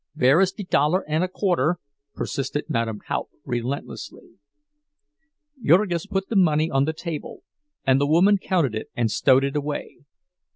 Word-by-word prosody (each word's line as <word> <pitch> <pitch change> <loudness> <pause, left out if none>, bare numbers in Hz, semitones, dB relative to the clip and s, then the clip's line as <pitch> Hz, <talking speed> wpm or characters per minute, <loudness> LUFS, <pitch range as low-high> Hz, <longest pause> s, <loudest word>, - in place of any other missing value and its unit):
"Vere 140 +4 +4
is 190 -1 +3
de 205 - -7
dollar 175 0 +1
und 155 +3 +1
a - - +1
quarter?" 175 -4 0 0.4
persisted 140 +2 -3
Madame 115 -2 -1
Haupt, - - -4
relentlessly. 125 +3 -5 1.3
Jurgis 175 +1 +3
put 195 -1 -2
the 230 - -4
money 160 -4 +3
on 135 +1 +2
the 160 - 0
table 160 -1 -7 0.4
and 135 +1 +4
the 145 - +2
woman 190 +6 +4
counted 170 - 0
it 110 - -5
and 115 -2 0
stowed 130 +6 +4
it 140 +1 -2
away. 145 0 -4
150 Hz, 155 wpm, -23 LUFS, 135-180 Hz, 1.3 s, Vere